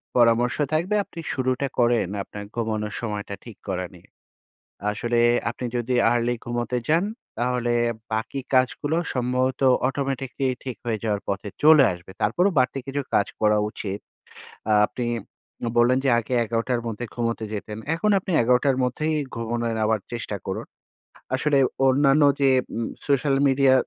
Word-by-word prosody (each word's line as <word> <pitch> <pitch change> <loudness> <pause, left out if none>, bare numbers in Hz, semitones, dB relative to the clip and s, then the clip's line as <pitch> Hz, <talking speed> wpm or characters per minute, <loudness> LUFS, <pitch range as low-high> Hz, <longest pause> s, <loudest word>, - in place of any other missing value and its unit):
পরামর্শ 120 0 +4 0.2
থাকবে 175 +7 +1
আপনি 170 - -11
শুরুটা 130 +1 0
করেন 120 -4 +3 0.2
আপনার 105 +1 -8
ঘুমানোর 110 -2 -2
সময়টা 105 -3 -4
ঠিক 115 -4 -10
করা 90 -1 -2
নিয়ে। 90 +1 -18 0.8
আসলে 120 +2 -1 0.3
আপনি 120 +2 -5
যদি 120 +1 -1 0.2
early 120 0 +1
ঘুমোতে 120 +1 -2
যান, 165 +5 +3 0.3
তাহলে 120 0 0 0.4
বাকি 110 +5 -2
কাজগুলো 130 +4 +2 0.2
সম্ভবত 125 +1 0 0.3
automatically 135 -1 -2 0.2
ঠিক 130 -3 -4
হয়ে 110 -3 -1
যাওয়ার 105 -2 0
পথে 100 +1 -2 0.2
চলে 155 -2 +8
আসবে। 90 +2 -12
তারপরও 180 - +2
বাড়তি 130 +1 +1
কিছু 140 +1 -2
কাজ 100 - +3
করা 105 0 +4
উচিত। 100 -1 -5 0.7
আ - - +3 0.2
আপনি 125 - -4 0.7
বললেন 120 +2 +5
যে, 135 - +3
আগে 120 +2 -5
১১ঃ০০ 115 +2 -1
মধ্যে 115 +2 -4
ঘুমোতে 115 -2 -1
যেতেন। 105 0 -5 0.2
এখন 210 +6 0
আপনি 190 - -5
১১ঃ০০ 125 +3 +3
মধ্যেই 155 +5 0 0.2
ঘুমোনোর 115 0 -2
আবার 110 -1 +2
চেষ্টা 115 -3 -4
করুন। 95 - -4 0.7
আসলে 145 +2 +2 0.3
অন্যান্য 140 +2 +4 0.2
যে 135 - +5 0.3
উম 115 - -1 0.2
সোশ্যাল 140 0 +2
মিডিয়া, 135 0 +4
120 Hz, 145 wpm, -24 LUFS, 115-135 Hz, 0.8 s, চলে